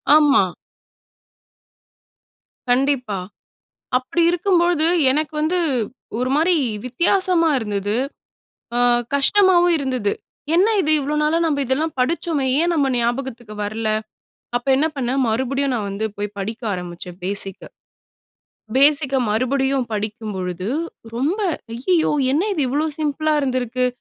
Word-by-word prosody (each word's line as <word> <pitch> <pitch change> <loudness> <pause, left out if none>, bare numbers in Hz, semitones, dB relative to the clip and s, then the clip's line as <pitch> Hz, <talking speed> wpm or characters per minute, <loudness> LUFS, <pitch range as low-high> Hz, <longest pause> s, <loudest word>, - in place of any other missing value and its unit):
ஆமா. 290 -8 +5 2.3
கண்டிப்பா. 250 -5 +1 0.8
அப்படி 255 +7 -2
இருக்கும்போது 345 -2 +2 0.3
எனக்கு 305 +2 -1
வந்து 330 +4 +1 0.6
ஒரு 250 +1 -1
மாரி 335 +3 +3 0.3
வித்தியாசமா 340 +5 +2
இருந்தது. 205 -1 -2 0.8
அ - - +2 0.4
கஷ்டமாவும் 350 +4 +4
இருந்தது. 255 -7 -1 0.4
என்ன 380 +5 +4
இது 310 - +1
இவ்ளோ 285 +2 -2
நாளா 310 +2 +2
நம்ம 285 -3 0
இதெல்லாம் 300 +6 -1
படிச்சோமே? 300 0 0
ஏன் 345 +1 +2
நம்ம 285 -3 +2
ஞாபகத்துக்கு 240 -2 -3
வரல? 215 +1 -3 0.7
அப்ப 245 - -1
என்ன 300 +4 +2
பண்ணேன், 265 0 0
மறுபடியும் 265 +4 0
நான் 210 -4 -2
வந்து 200 +3 -3
போய் 205 0 -4
படிக்க 220 +5 -4
ஆரம்பிச்சேன் 180 0 -7
பேசிக்கு. 195 0 -4 1.1
பேசிக்கு 280 -1 +4
மறுபடியும் 265 +3 +1
படிக்கும் 215 0 -4
பொழுது, 180 +1 -4 0.5
ரொம்ப 300 - 0 0.4
"ஐய்யயோ! 320 +7 +1 0.2
என்ன 305 - +2
இது 305 - 0
இவ்ளோ 295 +4 0
சிம்பிள்ளா 310 0 0
இருந்திருக்கு. 255 -2 0
270 Hz, 110 wpm, -21 LUFS, 225-310 Hz, 2.3 s, ஆமா